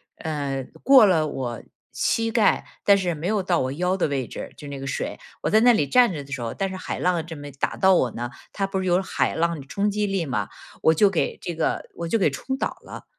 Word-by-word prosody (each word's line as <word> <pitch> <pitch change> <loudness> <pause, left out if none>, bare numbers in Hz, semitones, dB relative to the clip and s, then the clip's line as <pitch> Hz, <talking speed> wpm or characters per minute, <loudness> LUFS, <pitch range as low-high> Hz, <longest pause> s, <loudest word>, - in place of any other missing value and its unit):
呃， 140 -4 -3 0.2
过 265 -4 +8
了 165 -6 +3
我 125 -5 -4 0.3
膝 225 0 0
盖， 225 -2 +3 0.2
但 200 -1 +6
是 180 -3 -1
没 160 +2 -4
有 210 -1 +1
到 180 -2 +1
我 130 0 -1
腰 180 +5 0
的 185 - +1
位 135 -4 -2
置， - - -7
就 145 - -9
那 140 -1 -6
个 135 - -6
水。 - - -3 0.2
我 - - +1
在 215 - +6
那 245 +2 +6
里 150 -11 +2
站 245 - +5
着 145 -4 -5
的 140 - -15
时 130 -2 -3
候， 115 -1 -3
但 195 - -1
是 190 - -6
海 185 - -5
浪 175 -3 +1
这 165 -1 -8
么 145 0 -8
打 - - -1
到 190 0 +5
我 125 -9 +2
呢。 120 +1 -5 0.2
它 195 - -1
不 195 0 -2
是 185 - -2
有 180 0 +3
海 190 - -1
浪 165 -2 0
的 - - -12
冲 205 +7 0
击 210 0 0
力 195 -4 -1
嘛， 105 -8 -2 0.3
我 160 - +5
就 200 +6 +5
给 185 - -1
这 175 - -5
个 160 - -1
我 170 - -4
就 195 - +2
给 180 -8 +2
冲 265 - -4
倒 - - -3
了。 - - -10
170 Hz, 280 characters per minute, -24 LUFS, 140-195 Hz, 0.3 s, 过